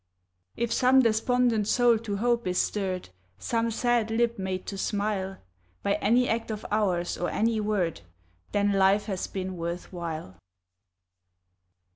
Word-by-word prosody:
If 235 0 0
some 260 +1 +5
despondent 230 -1 +2
soul 240 -1 +4
to 210 -3 -4
hope 235 0 +1
is 180 0 0
stirred, 185 - -1 0.3
Some 230 - -1
sad 235 0 +1
lip 235 0 +1
made 190 -1 -3
to 195 - -5
smile, 200 -2 -1 0.5
By 200 - +2
any 245 +4 +3
act 225 0 -1
of 215 -1 -5
ours, 185 -5 0
or 175 - -1
any 225 0 +1
word, 200 - -1 0.5
Then, 205 0 +2
life 195 +1 +3
has 190 -4 -3
been 185 -1 -5
worth 170 +2 -5
while. 160 - -6
210 Hz, 140 wpm, -27 LUFS, 190-230 Hz, 0.5 s, some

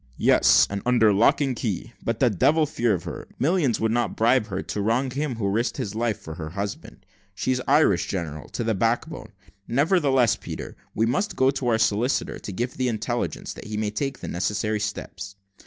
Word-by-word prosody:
"Yes, - - +5
and 100 0 -4
under 115 -4 +4
lock 110 +8 +4
and 135 -3 0
key; 115 +1 -3
but 115 0 -2
the 125 -3 +4
devil 150 - +3
a - - +3
fear 120 -7 +1
of 85 - -6
her. - - -7
Millions 150 - +1
would 110 0 +1
not 115 -4 0
bribe 115 0 +3
her 95 -2 -4
to 105 - -3
wrong 120 +5 +1
him 140 0 -2
who 110 -3 -2
risked 110 +5 0
his 100 - -3
life 115 -1 -1
for 80 - -8
her 80 -1 -6
husband. 100 +4 -6 0.3
She's 130 +5 0
Irish, 135 - +4
general, 80 -5 -4
to 120 - -3
the 110 0 +1
back 115 +6 +1
bone. 155 -10 -9 0.4
Nevertheless, 135 - +3
Peter, - - -7 0.2
we 110 - +2
must 185 - -1
go 130 +1 +4
to 135 -2 -3
our 115 -2 +3
solicitor, 115 +4 0
to - - -7
give 120 +6 -3
the 130 -1 0
intelligence, 120 +1 -3
that - - -11
he 105 0 -4
may 105 -1 -1
take 135 +5 -3
the - - -5
necessary 105 +4 -1
steps." 100 -1 -5
115 Hz, 205 wpm, -24 LUFS, 105-130 Hz, 0.4 s, Yes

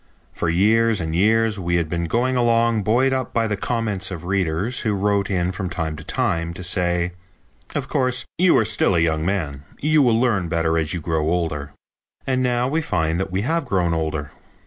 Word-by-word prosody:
For 85 - -1
years 110 +5 +3
and 80 -1 -3
years 110 +3 +2
we 85 -1 -1
had 85 -2 +1
been 85 +1 -2
going 125 +8 0
along 115 -2 +2
buoyed 125 +7 +2
up 130 -2 -3
by 115 -1 +2
the 105 -1 -1
comments 105 -3 -2
of 90 -3 -7
readers 95 +5 0
who 105 -2 0
wrote 100 0 0
in 90 -2 0
from 95 -1 -4
time 80 -3 -3
to 80 - -9
time 85 +1 -1
to 90 - -7
say: 90 -1 0 0.6
"Of - - -2
course, 125 -1 0
you 180 -1 +5
are 110 - +3
still 105 -3 +2
a - - +3
young 80 -1 +1
man. 80 -7 -2 0.2
You 155 +1 +3
will 120 -4 +3
learn 110 -8 +1
better 80 0 +1
as 80 -1 -2
you 85 - -4
grow 80 -1 -1
older." 80 -5 -2 0.5
And 130 -1 0
now 125 -1 +1
we 155 +4 0
find 80 - -1
that 95 - -2
we 95 +2 -1
have 165 +4 0
grown 90 -7 0
older. 80 -3 -2
95 Hz, 205 wpm, -22 LUFS, 85-115 Hz, 0.6 s, you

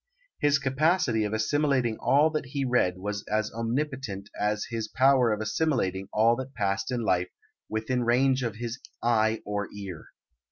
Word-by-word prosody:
His 145 -2 +4
capacity 135 - +1
of 105 - -3
assimilating 130 +1 +1
all 150 +3 +4
that 155 -4 -3
he 135 +1 -2
read 120 -8 +2
was 105 +2 -4
as 110 0 -1
omnipotent 115 -4 -3
as 105 0 -1
his 115 -1 -2
power 130 0 +4
of 105 0 -1
assimilating 110 - -1
all 115 +2 +4
that 130 +1 -7
passed 100 -2 -1
in 125 -2 -1
life 90 -5 +1 0.4
within 115 +3 -1
range 130 +3 +3
of 115 -3 -2
his 120 +2 -5 0.2
eye 110 -2 +2
or 105 0 -2
ear. 100 -5 -8
115 Hz, 160 wpm, -27 LUFS, 105-135 Hz, 0.4 s, His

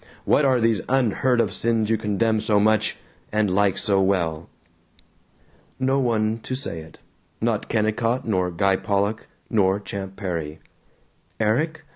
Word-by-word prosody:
What 145 - +3
are 130 -2 +3
these 115 -3 +2
unheard 125 -1 +2
of 110 -3 +1
sins 115 -1 0
you - - +4
condemn 110 +1 0
so 105 -1 +2
much 110 +1 +2 0.3
and 105 -3 +1
like 100 0 +2
so 100 -1 +1
well?" 85 -4 0 1.3
No 135 +1 +2
one 115 -3 0
to 130 - -5
say 130 - -5
it. 80 0 -13 0.4
Not - - -1
Kennicott 115 +3 0
nor 90 -4 +1
Guy 95 +3 +1
Pollock 100 +3 -1 0.2
nor 100 -3 +2
Champ 95 -1 -6
Perry. 85 -6 -4 0.8
Erik? 140 +9 0
110 Hz, 140 wpm, -23 LUFS, 95-115 Hz, 1.3 s, you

